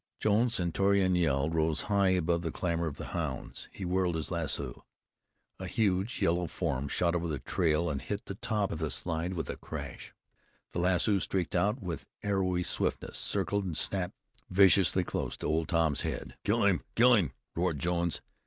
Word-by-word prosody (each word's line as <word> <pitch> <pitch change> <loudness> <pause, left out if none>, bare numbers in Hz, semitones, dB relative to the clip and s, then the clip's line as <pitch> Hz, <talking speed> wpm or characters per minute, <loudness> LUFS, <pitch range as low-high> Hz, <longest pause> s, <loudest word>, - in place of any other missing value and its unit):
Jones's 115 +3 +3
stentorian 95 +2 +2
yell 75 -5 +2
rose 80 -1 +1
high 100 -2 +2
above 85 -2 +2
the 80 -2 -3
clamor 85 0 -1
of 75 - -5
the - - -6
hounds. 75 -6 -4
He 95 - -6
whirled 90 -1 +1
his 80 +2 -3
lasso. 70 -7 -2 0.8
A 95 - -5
huge 100 +1 0
yellow 85 +1 +2
form 70 -2 -2
shot 85 +3 +1
over 85 -1 -1
the 75 -3 -2
trail 80 +4 +1
and 70 -4 -2
hit 100 0 -4
the - - -5
top 105 0 -1
of 80 - -4
the 80 -2 -1
slide 85 +4 -2
with 80 - -3
a - - -4
crash. - - -7 0.6
The - - -1
lasso 95 +3 +3
streaked 90 -2 -1
out 105 +6 +1
with 85 -5 -5 0.2
arrowy 95 -3 +1
swiftness, - - -1
circled, 100 0 0
and 85 -5 -3
snapped 90 +2 -1 0.3
viciously 95 -1 +5
close - - -3
to - - -6
Old 80 +1 +1
Tom's 80 -4 +2
head. - - -4
"Kill 105 +1 +2
him! 90 -8 +3
Kill 125 +2 +6
him!" 90 - +2 0.2
roared 85 -2 0
Jones. 85 +2 0
90 Hz, 180 wpm, -30 LUFS, 80-95 Hz, 0.8 s, Kill